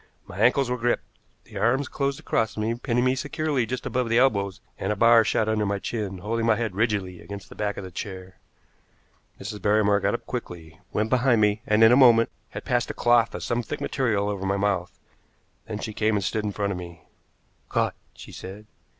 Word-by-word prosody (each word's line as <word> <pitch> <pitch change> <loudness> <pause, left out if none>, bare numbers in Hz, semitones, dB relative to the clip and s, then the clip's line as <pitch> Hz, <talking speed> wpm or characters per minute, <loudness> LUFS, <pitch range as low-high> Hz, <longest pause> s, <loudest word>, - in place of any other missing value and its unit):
My 95 - -10
ankles 125 +4 +4
were 125 0 -2
gripped, 120 +1 0 0.4
the 105 -3 -8
arms 125 +6 +2
closed 140 -1 -2
across 110 -1 -1
me, 110 +2 0
pinning 120 0 -1
me 130 - +3
securely 145 -2 -1
just 130 +1 -4
above 125 -2 -1
the 115 - +3
elbows, 100 -7 +2 0.2
and 95 - -1
a - - 0
bar 115 +2 +6
shot 110 0 +1
under 110 -1 +1
my 100 0 0
chin, 100 -2 -4
holding 115 +4 -2
my 115 - +5
head 110 -3 -2
rigidly 100 -4 -1
against 100 -2 -9
the - - -12
back 105 -1 -2
of - - -5
the 95 - -8
chair. 95 0 -8 1.0
Mrs. 105 +1 -7
Barrymore 105 -1 +3
got - - 0
up - - -7
quickly, 80 -1 -7
went 110 +1 -1
behind 125 -2 +3
me, 105 0 +2
and, 105 +1 +4
in 110 - +8
a - - +7
moment, 120 -4 +6 0.2
had - - -8
passed 125 -3 0
a - - -5
cloth 120 -1 +3
of - - -5
some 120 0 0
thick 110 - -6
material 110 -7 0
over 100 -2 -3
my 100 +1 +1
mouth. 100 -3 -1 0.7
Then 110 -2 -4
she 110 +1 -5
came 110 +1 +1
and 100 - 0
stood 105 +3 -1
in 105 - -1
front 100 0 -2
of 90 - -4
me. 85 -3 -10 0.6
"Caught!" - - 0 0.2
she - - -12
said. 100 +3 -9
110 Hz, 215 wpm, -25 LUFS, 100-120 Hz, 1.0 s, in